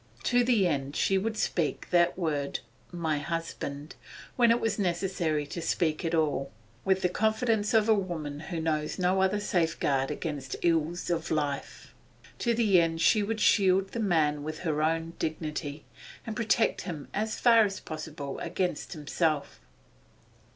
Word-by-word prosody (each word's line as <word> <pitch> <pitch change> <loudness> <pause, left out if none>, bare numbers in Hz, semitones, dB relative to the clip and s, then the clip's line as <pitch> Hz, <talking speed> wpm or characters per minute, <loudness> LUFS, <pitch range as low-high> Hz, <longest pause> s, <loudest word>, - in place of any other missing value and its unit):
To 245 0 +3
the 235 -6 +3
end 140 -3 -2
she 195 0 +2
would 220 +2 -2
speak 165 -7 -1
that 175 0 +3
word 150 -5 -2 0.3
'my 160 -4 -1
husband,' 150 -2 -5 0.4
when 240 -2 +4
it 230 +1 +4
was 225 -1 -1
necessary 175 -5 0
to 170 +4 -6
speak 160 -2 0
it - - 0
at 165 - 0
all, 145 -4 0 0.3
with 190 0 +1
the - - +5
confidence 220 +2 +1
of 220 -1 +4
a 220 - +6
woman 165 -8 -3
who 165 +1 -5
knows 155 -1 -1
no 185 +1 +2
other 190 +2 +2
safeguard 160 -8 0
against 145 -5 -4
the - - -1
ills 165 +2 -1
of 165 -1 -1
life. 145 -3 -3 0.5
To 235 -1 +1
the 205 -6 +4
end 165 -1 -1
she 215 +5 +4
would 215 +2 -2
shield 190 -1 +4
the 235 - -4
man 155 -8 +2
with 155 +2 -5
her 155 -4 -1
own 165 +1 0
dignity, 155 -2 -4 0.4
and 220 - -4
protect 225 -1 +1
him 160 -6 -6
as 215 +2 -2
far 230 -2 +6
as 195 -2 -2
possible 155 -3 -6
even - - -4
against 180 -2 -2
himself. 155 -1 -1
170 Hz, 165 wpm, -29 LUFS, 155-200 Hz, 0.5 s, a